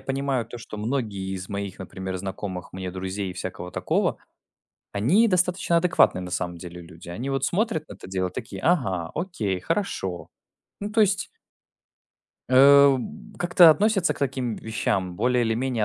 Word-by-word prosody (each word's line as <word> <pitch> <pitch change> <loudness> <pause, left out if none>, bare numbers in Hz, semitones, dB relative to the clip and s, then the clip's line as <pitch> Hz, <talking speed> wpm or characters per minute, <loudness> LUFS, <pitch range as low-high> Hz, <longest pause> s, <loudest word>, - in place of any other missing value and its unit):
понимаю, 135 -3 -1
то, 120 - -9
что 110 -2 -9
многие 105 -5 -2
из 95 +1 -7
моих, 100 -1 -4
например, 95 +1 -5
знакомых 95 -1 -6
мне 95 0 -5
друзей 95 +1 -4
и - - -6
всякого 90 -1 -6
такого, - - 0 0.8
они 150 - +4
достаточно 180 -2 +2
адекватные, 170 - +3
на 90 - -6
самом 90 -1 -3
деле, 90 0 -9
люди. 85 +1 -13
Они, 115 +11 -4
вот, 135 0 0
смотрят 180 -6 -1
на - - -8
это - - -12
дело, 95 -1 -1
такие: 95 +1 -7
ага, 95 - +1
окей, 130 - -2
хорошо. 95 - -2 0.5
Ну, 205 - -4
то 225 - +3
есть 200 -1 +3 1.2
э, 140 +1 +7
б 205 - -9
как-то 175 -1 +7
относятся 195 +2 +2
к - - -13
таким 130 -5 -1
вещам 95 -5 -2
более 125 +1 +2
или 115 - +1
менее 120 -2 0
115 Hz, 165 wpm, -25 LUFS, 95-155 Hz, 1.2 s, э